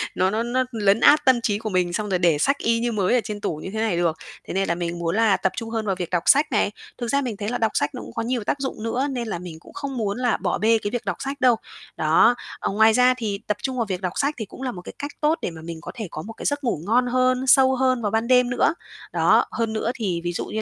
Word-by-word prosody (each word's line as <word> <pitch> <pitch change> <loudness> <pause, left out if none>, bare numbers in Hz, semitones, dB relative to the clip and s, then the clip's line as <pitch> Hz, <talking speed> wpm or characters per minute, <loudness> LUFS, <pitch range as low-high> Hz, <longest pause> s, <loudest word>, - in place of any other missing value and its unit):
nó 185 +1 +2
nó 220 +3 -1
nó 255 +2 0
lấn 205 -1 +2
át 300 +2 +5
tâm 255 -3 +4
trí 205 -3 0
của 220 - -4
mình, 180 -2 0
xong 210 +2 -2
rồi 180 -2 +1
để 170 -4 +3
sách 275 - +2
y 230 0 +1
như 240 0 -1
mới 210 +2 +1
ở 240 - +3
trên 205 -1 -6
tủ 155 - -2
như 155 - -7
thế 220 - -3
này 220 -6 0
được. 165 -2 +1 0.3
Thế - - -5
nên 195 0 0
là 170 - 0
mình 170 0 -4
muốn 170 +1 -1
là 220 -3 +3
tập 190 - 0
trung 230 -2 -4
hơn 225 -1 -2
vào 195 -2 0
việc 180 -2 -4
đọc 175 -1 0
sách 290 +1 +4
này. 210 -2 +1 0.3
Thực 240 - -4
ra 280 +4 +1
mình 235 -6 -4
thấy 205 +1 -3
là 245 - -1
đọc 225 -2 +1
sách 145 - +1
nó - - -6
cũng 115 - -10
có - - -2
nhiều 240 -1 -1
tác 275 - -1
dụng 265 -5 -4
nữa, 250 +4 -1
nên 240 -3 -3
là 185 -5 -3
mình 170 -3 -9
cũng - - -16
không 275 -2 -5
muốn 210 -1 -1
là 245 -2 +1
bỏ - - -1
bê 225 +1 +3
cái 205 -1 -4
việc 245 -1 -3
đọc - - -2
sách 275 0 -5
đâu, 250 -2 +5 0.4
đó. 165 +10 +4 0.2
Ờ, - - -2
ngoài 220 +2 +5
ra 250 +2 +5
thì 210 -4 -3
tập 210 - 0
trung 260 -1 -2
vào 235 - 0
việc 190 -1 -4
đọc 185 -1 -2
sách 285 +2 +1
thì 220 - -4
cũng 230 - -13
là 260 -2 -2
một, 180 -6 -9
cái, - - -10
cách 285 +1 -4
tốt 310 +2 +2
để - - -3
mà 160 - -10
mình 165 0 -7
có - - -7
thể 220 -4 -5
có 155 - -5
một, 220 +7 -8
cái, - - -9
giấc 285 0 0
ngủ 225 -11 -1
ngon 245 +5 +2
hơn, 255 +1 +1
sâu 265 +1 +6
hơn 255 -1 +1
vào 205 -2 -1
ban 225 +1 0
đêm 250 -1 +4
nữa. 245 +4 +2 0.4
Đó, - - +4
hơn 225 -2 -2
nữa 220 +1 -1
thì, 185 -8 -2
ví 175 0 -2
dụ - - -3
như 220 - -3
225 Hz, 315 wpm, -23 LUFS, 190-250 Hz, 0.4 s, sâu